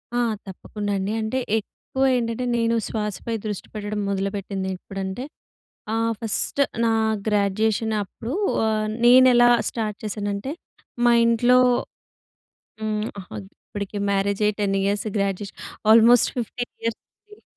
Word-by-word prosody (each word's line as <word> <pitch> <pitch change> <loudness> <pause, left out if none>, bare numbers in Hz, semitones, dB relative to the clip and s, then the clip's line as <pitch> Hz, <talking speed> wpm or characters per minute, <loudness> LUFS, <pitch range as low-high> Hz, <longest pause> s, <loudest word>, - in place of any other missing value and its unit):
ఆ! - - +2 0.3
తప్పకుండ 205 +2 -7
అండి. 195 +2 -2
అంటే 220 +4 -1 0.2
ఎక్కువ 265 +5 -5
ఏంటంటే 230 +1 -2
నేను 230 0 +1
శ్వాసపై 215 +1 -3
దృష్టి 210 -3 -4
పెట్టడం 210 0 -4
మొదలుపెట్టిందెప్పుడంటే 195 +1 -4 0.7
ఆహ్, 225 0 +1
ఫస్ట్ 225 +4 -1 0.2
నా 230 - +3 0.4
గ్రాడ్యుయేషనప్పుడూ, 215 +2 0 0.3
ఆహ్, 215 -1 +1 0.2
నేనెలా 245 -1 +7 0.2
స్టార్ట్ 215 -3 -3
చేశానంటే 205 +3 -3 0.5
మా 240 - +6
ఇంట్లో 240 +2 +4 1.2
హ్మ్. 215 0 -1
ఆహ్, 185 - -14 0.4
ఇప్పటికి 205 0 -5
మ్యారేజయ్యి 200 +1 +1
10 195 -1 +1
ఇయర్స్ 205 +2 0
గ్రాడ్యుయేషన్ 200 0 -2 0.3
ఆల్మోస్ట్ 230 +2 +7
15 245 +1 -4
ఇయర్స్ 230 -1 -2 0.3
అయింది. 420 0 -17
215 Hz, 110 wpm, -23 LUFS, 200-230 Hz, 1.2 s, నేనెలా